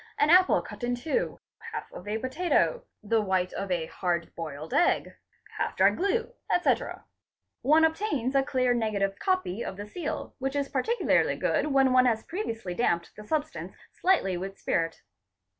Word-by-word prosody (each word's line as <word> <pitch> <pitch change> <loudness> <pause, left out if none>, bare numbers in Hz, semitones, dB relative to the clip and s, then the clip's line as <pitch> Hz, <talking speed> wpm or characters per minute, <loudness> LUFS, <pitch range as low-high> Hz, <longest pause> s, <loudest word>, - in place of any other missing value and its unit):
an 295 +2 +4
apple 370 +1 +6
cut - - -10
in 245 0 0
two, 320 - -2 0.3
half - - -6
of - - -10
a 210 +1 -1
potato, 350 - +1 0.2
the 220 +1 +2
white 185 -2 0
of 195 - -4
a 175 -3 0
hard 170 0 -2
boiled 155 -1 -6
egg, 350 - +2 0.5
half - - -1
dry - - +6
glue, 455 +6 -1 0.2
etc; 355 - +1 0.6
one 310 +4 +5
obtains 320 - 0
a 275 - +4
clear 255 -2 +1
negative 205 -4 -1
copy 370 - 0
of 190 - -6
the 205 - -6
seal, 305 +9 -5
which 270 +1 -2
is 280 -1 0
particularly 375 - +2
good - - 0
when 270 -2 +4
one 255 0 +6
has 220 -2 +1
previously 230 - -4
damped 170 -5 0
the 210 - -10
substance 305 +7 -3 0.2
slightly 355 - +2
with 195 +2 -5
spirit. 165 -1 -1
250 Hz, 165 wpm, -28 LUFS, 195-320 Hz, 0.6 s, apple